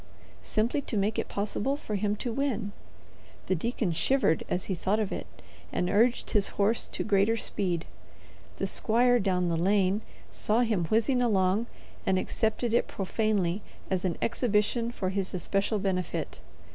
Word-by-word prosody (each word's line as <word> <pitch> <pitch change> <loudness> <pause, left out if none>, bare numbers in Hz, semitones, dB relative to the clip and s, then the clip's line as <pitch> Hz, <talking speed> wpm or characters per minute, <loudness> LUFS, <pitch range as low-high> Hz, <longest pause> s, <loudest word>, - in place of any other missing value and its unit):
Simply 220 - 0
to 235 - -4
make 205 +2 +1
it - - -2
possible 210 +6 -1
for 220 - -6
him 205 +1 0
to 235 +2 -3
win. 235 -6 -1 0.7
The - - +1
deacon 210 +1 -1
shivered 165 - +2
as 180 - -1
he 195 - -1
thought 195 +4 0
of 210 -2 -1
it, - - -4 0.4
and 180 - 0
urged 230 +4 +2
his 205 -2 +3
horse 210 +3 +2
to - - -4
greater 210 +2 +3
speed. 180 -6 -1 0.7
The - - -1
squire, 240 +5 +3
down 185 -3 +1
the 165 - +1
lane, 195 +3 +2 0.3
saw 220 +3 +1
him 215 -8 +1
whizzing 230 - +2
along 205 -1 +2 0.4
and 190 -1 +2
accepted 220 +4 -1
it 235 - +3
profanely 200 -2 0 0.3
as 185 -1 0
an 180 -4 -1
exhibition 230 0 +1
for 190 -5 -2
his 190 -1 -2
especial 195 +4 0
benefit. 190 -3 -2
205 Hz, 160 wpm, -29 LUFS, 190-230 Hz, 0.7 s, his